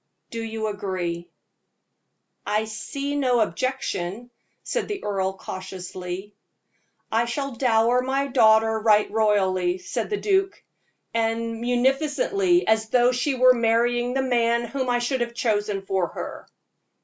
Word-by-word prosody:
Do 230 - -4
you 220 -1 -4
agree?" 185 -5 -3 1.1
"I 215 +1 0
see 275 +6 -4
no 255 -4 +2
objection," 230 0 -2 0.3
said - - -2
the 410 -2 -5
earl, 190 -2 -1
cautiously. 185 +1 -7 0.8
"I 230 +2 +2
shall 275 +4 -3
dower 235 0 +3
my 270 +2 0
daughter 220 -4 +4
right 210 -1 +3
royally," 190 -4 +2
said 185 - -4
the 415 - -1
duke 390 -1 0 0.5
"as 225 0 +1
munificently 270 - +1
as 220 0 +2
though 245 +1 +4
she 255 +3 0
were 255 0 +6
marrying 240 +1 +1
the 270 - +1
man 235 -2 +2
whom 255 +2 -3
I 245 - +2
should 240 +1 -1
have 235 0 -3
chosen 205 -4 -1
for 190 -2 0
her." - - -7
230 Hz, 130 wpm, -24 LUFS, 210-255 Hz, 1.1 s, were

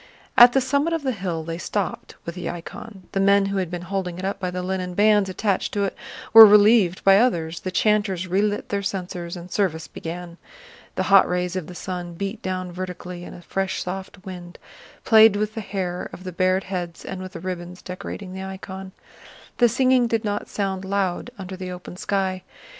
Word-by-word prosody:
At 240 0 +9
the 270 - +3
summit 280 +5 +1
of 325 -3 -1
the 265 - +1
hill 180 -7 -3
they 165 +1 -5
stopped 200 +1 -3
with 170 - -4
the 180 - -5
icon; 190 +3 -8
the 195 - -1
men 200 0 +4
who 195 0 -2
had 185 -3 -1
been 175 0 -5
holding 180 -1 -3
it 185 - -5
up 195 0 -2
by 185 -2 -2
the 180 0 -4
linen 185 -1 -3
bands 205 -1 +4
attached 195 +1 -1
to 205 - 0
it 195 - -2 0.4
were 225 0 +13
relieved 210 -3 +6
by 195 0 +7
others, 170 -9 +1
the 185 - -4
chanters 200 -2 +1
relit 205 +3 0
their 200 0 -1
censers, 180 -3 -4
and 175 +1 -10
service 160 -6 -1
began. 170 +2 -7 0.6
The - - 0
hot 195 -1 +6
rays 180 0 -1
of 185 -4 -3
the 180 - -9
sun 175 -1 -5
beat 200 +5 -4
down 185 -1 -3
vertically 180 0 -6
and - - -9
a 175 - -12
fresh 195 +2 -2
soft 190 +1 -7
wind 175 -2 -9 0.5
played 220 -2 +7
with 215 +1 -1
the 225 - -4
hair 185 -3 -4
of 185 - -10
the 185 - -5
bared 185 +2 +1
heads 175 -3 -5
and 190 - -5
with 185 0 -8
the - - -6
ribbons 180 0 -6
decorating 185 +1 -7
the 190 - -6
icon. 190 0 -7 0.7
The 240 -2 +6
singing 255 +1 +3
did 225 -1 -1
not 205 -1 -2
sound 195 -2 -2
loud 195 +1 -1
under 190 -1 -7
the 185 0 -6
open 180 0 -8
sky. 190 0 -1
190 Hz, 205 wpm, -23 LUFS, 180-205 Hz, 0.7 s, were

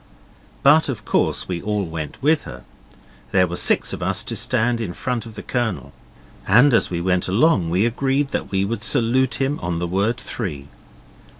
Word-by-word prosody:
But 150 +2 +5
of 105 -5 -5
course - - 0
we 90 -2 -3
all 105 -1 -1
went 80 -3 -6
with 155 +2 +2
her. - - -9 0.3
So - - -26 0.4
there 95 -1 +5
were 85 0 -5
six - - +2
of - - -6
us - - 0
to - - -5
stand 115 +1 0
in 90 -6 -4
front 125 -2 -3
of 110 - -12
the - - -8
Colonel. 110 - -3 0.5
And 125 +7 +5
as 115 - +3
we 85 - -3
went 90 0 0
along 100 - +2
we 90 +6 +2
agreed 135 +4 0
that - - -3
we 95 0 0
would 110 +1 -3
salute 130 +1 +2
him 135 +2 -1
on 85 0 -2
the 85 - -2
word 100 +7 0
three. 75 - -6
110 Hz, 195 wpm, -21 LUFS, 90-125 Hz, 0.5 s, But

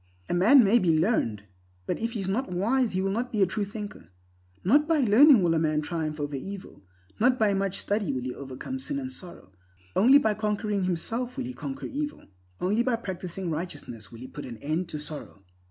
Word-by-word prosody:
A - - -2
man 225 +10 +7
may 220 +4 +5
be 165 -6 +3
learned, 155 - +1 0.4
but - - -2
if 230 +1 -2
he 215 - -3
is 190 - -3
not 230 +8 -1
wise 225 +7 +1
he 185 +1 0
will 195 - 0
not 235 +5 -2
be 210 -3 +2
a - - +6
true 205 +3 -2
thinker. 205 - -8 0.6
Not 290 - +4
by 325 -3 +3
learning 245 0 +7
will 170 -1 +3
a 160 - +2
man 155 -1 +1
triumph 155 -1 -3
over 145 -1 -3
evil; 195 +8 -8 0.4
not 250 +3 +4
by 215 -3 +3
much 195 -1 -1
study 205 -6 -1
will 130 -2 -3
he 125 0 -3
overcome 140 - -6
sin 280 +1 -3
and 265 -2 -4
sorrow. 175 - -11 0.4
Only 255 +8 +7
by 220 -7 +2
conquering 210 -2 -1
himself 230 +9 -2
will 265 - -2
he 255 - -5
conquer 275 +2 -6
evil; 295 +1 -4 0.3
only 205 +5 +1
by 245 -1 +1
practicing 185 -4 -5
righteousness 145 -9 -6
will 115 - -10
he 130 - -7
put 145 - -8
an 120 -2 -8
end 155 +8 -2
to 155 - -4
sorrow. 150 -9 -7
195 Hz, 215 wpm, -27 LUFS, 160-240 Hz, 0.6 s, man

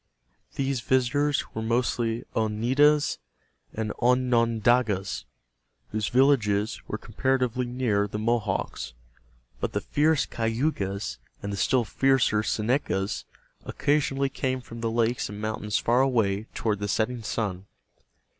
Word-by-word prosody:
These 135 -2 -1
visitors 130 +4 +1
were 110 - -3
mostly 115 0 0
Oneidas 130 +8 +2 0.5
and 110 -1 -3
Onondagas, 120 -4 +2 0.7
whose 105 -1 -1
villages 110 -6 +2
were 110 - -3
comparatively 125 +2 0
near 120 -5 0
the 105 - -5
Mohawks, 110 - -1 0.7
but - - -2
the - - +1
fierce 150 0 +2
Cayugas 115 -4 -2 0.2
and 100 0 -3
the - - -3
still 125 +3 +2
fiercer 135 -3 +2
Senecas 105 -3 -1 0.4
occasionally 140 -2 0
came 130 -1 -2
from 115 -2 -10
the 115 - 0
lakes 115 +1 0
and 105 0 -7
mountains 105 -1 -2
far 120 +2 +3
away 110 -6 +1
toward 105 -3 0
the 100 - -2
setting 115 +4 0
sun. 100 -3 -3
115 Hz, 115 wpm, -26 LUFS, 105-130 Hz, 0.7 s, far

